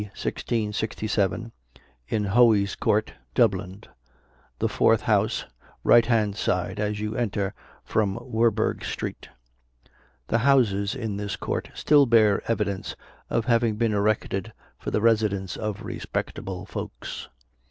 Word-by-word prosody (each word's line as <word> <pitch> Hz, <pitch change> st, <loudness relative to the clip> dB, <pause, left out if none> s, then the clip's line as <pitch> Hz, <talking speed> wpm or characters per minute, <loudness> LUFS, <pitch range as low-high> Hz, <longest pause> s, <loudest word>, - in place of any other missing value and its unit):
1667, 105 Hz, 0 st, -2 dB, 0.6 s
in 105 Hz, +7 st, 0 dB
Hoey's 105 Hz, -1 st, +4 dB
Court, 110 Hz, +1 st, +1 dB, 0.2 s
Dublin, 100 Hz, -3 st, +1 dB, 0.7 s
the -, -, +1 dB
fourth -, -, +3 dB
house, -, -, +1 dB, 0.4 s
right 115 Hz, -1 st, +6 dB
hand 110 Hz, -4 st, +2 dB
side, 95 Hz, -1 st, -1 dB
as 105 Hz, 0 st, -1 dB
you 105 Hz, +1 st, -3 dB
enter 105 Hz, -4 st, -1 dB, 0.3 s
from 105 Hz, -2 st, 0 dB
Werburgh 115 Hz, -2 st, 0 dB
street. -, -, -5 dB, 1.0 s
The 115 Hz, -, +2 dB
houses 115 Hz, -6 st, +3 dB
in 110 Hz, -6 st, -3 dB
this 100 Hz, 0 st, -3 dB
court -, -, -3 dB
still 145 Hz, -2 st, +4 dB
bear 110 Hz, -4 st, +4 dB
evidence 100 Hz, -4 st, -2 dB, 0.3 s
of 115 Hz, -, 0 dB
having 115 Hz, -2 st, +2 dB
been 115 Hz, 0 st, +1 dB
erected 100 Hz, -1 st, 0 dB, 0.3 s
for -, -, -4 dB
the 105 Hz, -, 0 dB
residence 105 Hz, -5 st, +1 dB
of 105 Hz, -2 st, -4 dB
respectable 95 Hz, +1 st, -4 dB
folks. -, -, -7 dB
105 Hz, 120 wpm, -25 LUFS, 100-115 Hz, 1.0 s, right